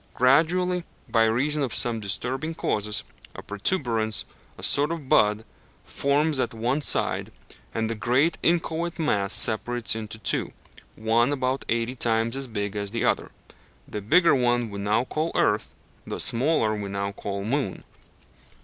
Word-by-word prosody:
Gradually, 175 Hz, +7 st, +3 dB, 0.2 s
by 115 Hz, -1 st, +3 dB
reason 140 Hz, +7 st, +1 dB
of 130 Hz, -6 st, -1 dB
some 115 Hz, -2 st, +1 dB
disturbing 130 Hz, +10 st, -3 dB
causes, 105 Hz, -5 st, -1 dB, 0.3 s
a -, -, -8 dB
protuberance, 110 Hz, -, 0 dB, 0.3 s
a -, -, -11 dB
sort 145 Hz, +3 st, +2 dB
of 160 Hz, -5 st, -5 dB
bud, 105 Hz, -2 st, +3 dB, 0.4 s
forms 145 Hz, +1 st, 0 dB
at 120 Hz, -2 st, -1 dB
one 125 Hz, +6 st, 0 dB
side, -, -, 0 dB, 0.4 s
and 110 Hz, 0 st, -1 dB
the 115 Hz, -, -2 dB
great 125 Hz, +9 st, +1 dB
inchoate 170 Hz, 0 st, 0 dB
mass 105 Hz, -, 0 dB
separates 120 Hz, +2 st, +2 dB
into 110 Hz, 0 st, -6 dB
two 110 Hz, -, -1 dB, 0.4 s
one 115 Hz, +4 st, +2 dB
about 130 Hz, -1 st, -1 dB
eighty 115 Hz, +2 st, 0 dB
times 115 Hz, -1 st, 0 dB
as 135 Hz, -1 st, -2 dB
big 105 Hz, -3 st, -4 dB
as 100 Hz, -1 st, -1 dB
the 115 Hz, +3 st, -2 dB
other. -, -, 0 dB, 0.6 s
The 105 Hz, -, -5 dB
bigger 165 Hz, -, +4 dB
one 120 Hz, -3 st, +1 dB
we 100 Hz, -, -6 dB
now 105 Hz, +4 st, +1 dB
call 155 Hz, +5 st, -2 dB
earth, -, -, +1 dB, 0.3 s
the -, -, -4 dB
smaller 120 Hz, -3 st, +3 dB
we 105 Hz, -2 st, -4 dB
now 100 Hz, 0 st, -3 dB
call 100 Hz, 0 st, -5 dB
moon. 130 Hz, -4 st, -2 dB
120 Hz, 150 wpm, -25 LUFS, 110-145 Hz, 0.6 s, bigger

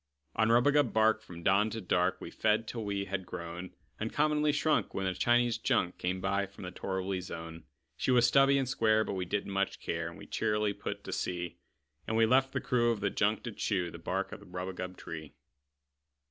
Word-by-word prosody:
On 110 Hz, 0 st, +3 dB
rubagub 135 Hz, +3 st, +4 dB
bark, 110 Hz, 0 st, +4 dB
from 85 Hz, -5 st, -11 dB
dawn 100 Hz, +4 st, +4 dB
to 115 Hz, -, -4 dB
dark, 90 Hz, -2 st, +1 dB
We -, -, -8 dB
fed, 110 Hz, +1 st, +1 dB
till 115 Hz, -1 st, -4 dB
we 100 Hz, -1 st, -1 dB
all -, -, -14 dB
had 95 Hz, -1 st, -1 dB
grown 85 Hz, +1 st, -7 dB, 0.2 s
Uncommonly 150 Hz, 0 st, +2 dB
shrunk, 155 Hz, +1 st, +1 dB
when 95 Hz, -, -1 dB
a 95 Hz, -, 0 dB
Chinese 120 Hz, +3 st, +2 dB
junk 90 Hz, -, +1 dB
Came 90 Hz, +1 st, -1 dB
by 100 Hz, +1 st, 0 dB
from 100 Hz, +1 st, -12 dB
the 90 Hz, -, -5 dB
torriby 95 Hz, 0 st, -3 dB
zone. 80 Hz, -2 st, -8 dB, 0.3 s
She -, -, -1 dB
was 125 Hz, -2 st, +5 dB
stubby 135 Hz, +1 st, +5 dB
and 135 Hz, -2 st, 0 dB
square, 110 Hz, -3 st, +3 dB
but -, -, -4 dB
we 95 Hz, -1 st, -2 dB
didn't 100 Hz, +2 st, -2 dB
much 100 Hz, 0 st, -1 dB
care, 85 Hz, 0 st, -3 dB
And 85 Hz, -, -12 dB
we -, -, -10 dB
cheerily 105 Hz, -1 st, 0 dB
put -, -, -5 dB
to -, -, -6 dB
sea; 90 Hz, -2 st, -3 dB, 0.5 s
And 110 Hz, -, 0 dB
we 115 Hz, -, +6 dB
left 130 Hz, +3 st, +3 dB
the -, -, -1 dB
crew 120 Hz, -1 st, +2 dB
of 115 Hz, -3 st, 0 dB
the 100 Hz, -1 st, 0 dB
junk 105 Hz, +1 st, +1 dB
to 120 Hz, -, -4 dB
chew 95 Hz, -4 st, -1 dB
The 85 Hz, -, -9 dB
bark 95 Hz, +3 st, -2 dB
of -, -, -7 dB
the -, -, -15 dB
rubagub 90 Hz, 0 st, -5 dB
tree. 80 Hz, -3 st, -8 dB
100 Hz, 215 wpm, -31 LUFS, 90-115 Hz, 0.5 s, we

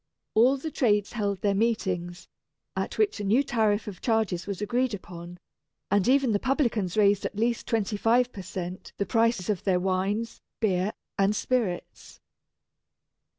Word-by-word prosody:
All 245 Hz, +5 st, +5 dB
the 315 Hz, +4 st, -5 dB
trades 210 Hz, -7 st, +1 dB
held 200 Hz, -4 st, -1 dB
their 200 Hz, -1 st, +2 dB
meetings, 185 Hz, -5 st, -1 dB, 0.5 s
at -, -, -3 dB
which 420 Hz, -, +1 dB
a -, -, -3 dB
new 225 Hz, +8 st, +3 dB
tariff 220 Hz, -5 st, +1 dB
of 200 Hz, -3 st, -7 dB
charges 220 Hz, -7 st, 0 dB
was 200 Hz, -3 st, -4 dB
agreed 240 Hz, +3 st, 0 dB
upon; 175 Hz, -2 st, -10 dB, 0.5 s
and 205 Hz, +1 st, +3 dB
even 265 Hz, -1 st, +4 dB
the 205 Hz, -, +2 dB
publicans 235 Hz, -, 0 dB
raised 200 Hz, -1 st, +4 dB
at -, -, -4 dB
least 235 Hz, +1 st, 0 dB
twenty 215 Hz, -2 st, 0 dB
five 240 Hz, +4 st, +2 dB
per 195 Hz, -, -7 dB
cent. 185 Hz, -1 st, -6 dB
the 200 Hz, -, 0 dB
prices 230 Hz, -5 st, +1 dB
of 205 Hz, -5 st, -1 dB
their 185 Hz, -2 st, +2 dB
wines, 195 Hz, +5 st, -1 dB, 0.2 s
beer, 195 Hz, -2 st, +1 dB, 0.3 s
and 200 Hz, +2 st, +3 dB
spirits. 225 Hz, -9 st, -2 dB
210 Hz, 155 wpm, -27 LUFS, 190-235 Hz, 0.5 s, All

